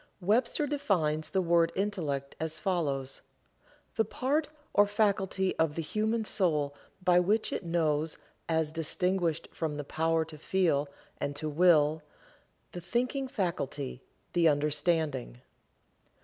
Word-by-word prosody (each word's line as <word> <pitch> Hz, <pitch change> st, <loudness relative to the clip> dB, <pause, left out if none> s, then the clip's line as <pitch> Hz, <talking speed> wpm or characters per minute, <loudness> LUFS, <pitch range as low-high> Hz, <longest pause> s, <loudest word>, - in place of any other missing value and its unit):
Webster 235 Hz, +9 st, +2 dB
defines 185 Hz, -, 0 dB
the 190 Hz, -1 st, +1 dB
word 170 Hz, -1 st, +3 dB
Intellect 160 Hz, -9 st, -2 dB
as 160 Hz, 0 st, -2 dB
follows: 140 Hz, -8 st, -1 dB, 0.8 s
The 220 Hz, -, +4 dB
part 285 Hz, +7 st, 0 dB, 0.3 s
or 205 Hz, 0 st, +5 dB
faculty 195 Hz, -2 st, +1 dB
of 160 Hz, -2 st, +2 dB
the 165 Hz, -, -2 dB
human 215 Hz, +6 st, 0 dB
soul 155 Hz, -9 st, +1 dB, 0.3 s
by 180 Hz, -1 st, +5 dB
which 210 Hz, +5 st, +1 dB
it -, -, -3 dB
knows, 160 Hz, -2 st, 0 dB, 0.3 s
as 160 Hz, -2 st, +1 dB
distinguished 170 Hz, +1 st, 0 dB
from 155 Hz, -2 st, -3 dB
the 145 Hz, -, -3 dB
power 160 Hz, +2 st, 0 dB
to 155 Hz, -1 st, -11 dB
feel 155 Hz, -5 st, +1 dB, 0.3 s
and 140 Hz, -, -2 dB
to 155 Hz, +2 st, -4 dB
will; 155 Hz, -1 st, +4 dB, 0.7 s
the 175 Hz, -, -7 dB
thinking 250 Hz, -, -1 dB
faculty; 145 Hz, -, -3 dB, 0.3 s
the 170 Hz, -2 st, +4 dB
understanding. 150 Hz, -, 0 dB
165 Hz, 125 wpm, -30 LUFS, 150-195 Hz, 0.8 s, or